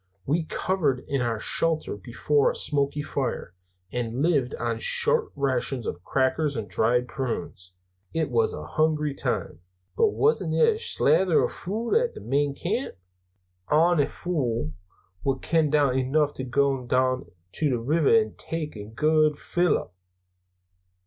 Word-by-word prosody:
We 160 +4 0
covered 155 -8 0
in 140 -2 -1
our 115 -2 -1
shelter 160 +4 0
before 120 +8 +1
a - - -4
smoky 145 0 0
fire, 135 -10 -3 0.4
and 120 +2 -2
lived 145 -7 +1
on - - -2
short 475 -2 +3
rations 130 -3 0
of 85 - -5
crackers 135 +3 0
and 110 -2 -4
dried 125 +4 +1
prunes 115 -9 -5 0.4
it 160 -4 -1
was 115 -2 +2
a 75 - -6
hungry 150 - 0
time." 135 - -3 0.4
"But 450 - +4
wasna 450 +2 +1
there 460 -2 +3
slathers 190 - +3
o' - - +2
food 220 +6 -4
at 470 +1 +2
the - - -7
main 140 +2 0
camp? 220 - -3 0.8
Ony 160 -1 +4
fule 120 - -2 0.5
wad 135 -1 -1
ken 160 -3 +2
enough 145 0 +2
to 130 - -5
gae 135 0 +1
doon 130 +1 +1 0.2
to 155 - 0
the 125 - +1
river 150 +5 +1
an' 215 - -5
tak' 160 -4 -4
a 105 -1 -7
guid 155 +6 +2
fill 175 -2 +1
up." 90 - -9
140 Hz, 145 wpm, -25 LUFS, 125-165 Hz, 0.8 s, But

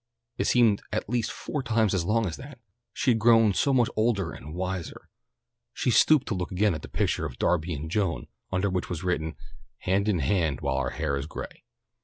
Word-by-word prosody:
It - - +1
seemed 115 -5 +4
at 105 - -2
least 120 0 0
four 150 - -4
times 110 -5 +1
as 95 -3 +1
long 110 +4 +2
as 85 -4 -3
that. 140 -1 -10 0.3
She 130 - +1
had 115 - +1
grown 115 -2 +5
so 140 - +2
much 125 -4 +3
older 110 -6 +1
and 75 +3 -9
wiser. 90 -1 -5 0.6
She 125 - 0
stooped 150 +4 +5
to - - 0
look 90 -2 -3
again 100 +1 +2
at 75 - -5
the - - -9
picture - - -1
of 65 - -11
Darby 85 -1 0
and 75 +3 -5
Joan, 85 - 0 0.3
under 95 +1 +1
which 90 -1 -2
was 90 -1 -4
written, 80 -4 -1 0.5
"Hand 100 +3 +1
in 100 - +2
hand 80 -2 0
while - - -1
our - - 0
hair 75 -3 -2
is 70 +2 -4
gray." - - -8
95 Hz, 210 wpm, -27 LUFS, 85-115 Hz, 0.6 s, grown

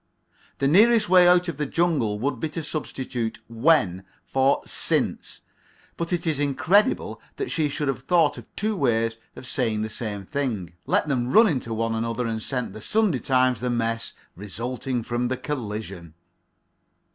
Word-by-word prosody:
The 135 - +1
nearest 215 +6 +5
way 180 -1 +7
out 180 0 +5
of 165 -5 -4
the 150 -1 -2
jungle 150 -11 +1
would 130 +2 -2
be 160 - -2
to 160 +1 -5
substitute 130 -6 -4
"when" 115 - +2 0.2
for 135 +1 +2
"since." - - 0 0.5
But 170 +1 -4
it 175 -1 -1
is 155 -3 0
incredible 165 - +1
that 405 - -4
she 155 -3 +1
should 145 +1 -3
have 135 -2 -2
thought 165 +1 +2
of - - -14
two 215 +1 -1
ways 115 - +1 0.2
of - - -10
saying 115 -5 -1
the 110 - -3
same 105 -3 -4
thing, 110 - -3
let - - +2
them 125 -3 -1
run 225 +2 +7
into 130 - -2
one 115 0 -1
another, 115 +2 -2
and 110 -1 -3
sent 125 +1 -3
"The 110 - -9
Sunday 205 - +1
Times" 130 -3 +2
the 125 +2 -2
mess 115 -1 -2 0.2
resulting 120 +5 -4
from 120 +1 -1
the 130 +1 -2
collision. 105 - -6
130 Hz, 170 wpm, -24 LUFS, 115-160 Hz, 0.5 s, way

